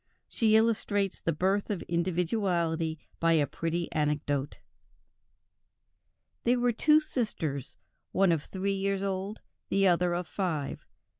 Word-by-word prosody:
She 220 -2 +2
illustrates 210 -3 +1
the 165 - 0
birth 190 +7 0
of 200 -5 -2
individuality 170 -2 0 0.2
by 165 0 +3
a 155 -3 +4
pretty 165 +4 -2
anecdote: 145 -2 -1 1.8
"There 245 +1 +3
were 245 0 +3
two 300 +7 +5
sisters, 210 - -3 0.3
one 190 -1 +3
of 160 -3 0
three 195 +1 -2
years 195 0 -1
old, 195 +2 -3 0.3
the 195 0 +3
other 175 -1 +3
of 175 0 -2
five. 160 -8 -3
185 Hz, 125 wpm, -29 LUFS, 165-200 Hz, 1.8 s, two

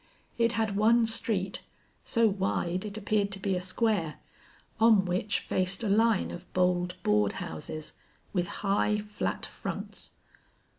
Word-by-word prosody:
It 230 0 +3
had 220 -3 0
one 225 +3 +4
street, 210 -4 0 0.4
so 230 -1 +3
wide 190 -2 -1
it 210 0 -5
appeared 205 -1 0
to 195 - -6
be 195 0 0
a 180 - 0
square, 185 -4 0 0.6
on 220 -4 +6
which 185 +3 -1
faced 185 +3 -1
a 215 - 0
line 220 0 +3
of - - -10
bold 180 0 +1
board 105 -1 +2
houses 150 - -6 0.4
with 180 -2 0 0.2
high, 205 +1 +2
flat 210 0 -3
fronts. - - -7
200 Hz, 140 wpm, -29 LUFS, 180-215 Hz, 0.6 s, on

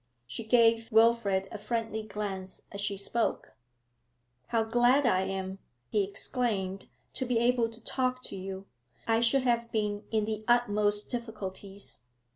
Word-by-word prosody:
She 125 - -6
gave 230 0 +4
Wilfrid 220 -4 +4
a 215 - -6
friendly 225 0 -2
glance 200 -3 -5
as 200 - -5
she 200 0 -1
spoke. 225 +4 -1 0.9
'How 230 -1 +2
glad 245 +5 +4
I 185 -6 +4
am,' 190 0 -4 0.3
he 210 - +3
exclaimed, 195 -2 -2 0.2
'to - - -3
be 245 -1 +1
able 235 0 +3
to 225 0 -12
talk 255 0 -1
to - - -6
you! 190 0 -6 0.4
I 225 0 +3
should 255 +3 +4
have 235 -2 +1
been 210 -1 -1
in 215 -2 +1
the 215 0 -3
utmost 210 -3 +2
difficulties. 205 - -6
220 Hz, 145 wpm, -30 LUFS, 200-235 Hz, 0.9 s, gave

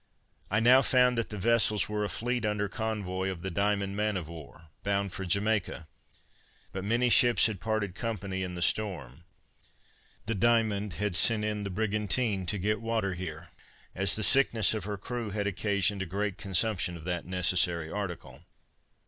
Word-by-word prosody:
I 105 - +2
now 125 +3 +6
found 125 -1 +3
that 115 - -2
the 105 - -6
vessels 110 0 +2
were 105 0 -2
a 105 - -2
fleet 120 +1 -2
under 105 -1 0
convoy 100 -4 -3
of 90 -3 -6
the 95 - -3
Diamond 100 +1 0
man 105 -1 0
of 85 -4 -5
war, 80 -1 -12
bound 100 -2 -1
for 95 - -5
Jamaica; 100 -2 0 0.9
but 95 - -5
many 115 +4 +1
ships 120 -1 +5
had 105 -5 -1
parted 110 -4 -1
company 100 -4 -4
in 90 -1 -4
the 85 - -2
storm. 90 - -2 1.0
The 115 - -1
Diamond 105 -3 +1
had 105 -3 -1
sent 105 +2 +3
in 105 -1 -2
the 100 - -4
brigantine 105 0 0
to 105 - 0
get 105 +2 -1
water 110 -4 -1
here, 85 -2 -7 0.4
as 95 +1 +1
the 110 - -1
sickness 110 -1 +3
of 110 -4 -4
her 105 -1 -4
crew 120 +2 -5
had 105 0 -2
occasioned 100 0 0
a 95 - -3
great 100 +2 -2
consumption 95 -2 0
of 80 - -12
that 90 -1 -3
necessary 90 -3 +2
article. 100 -4 -6
100 Hz, 175 wpm, -29 LUFS, 95-110 Hz, 1.0 s, now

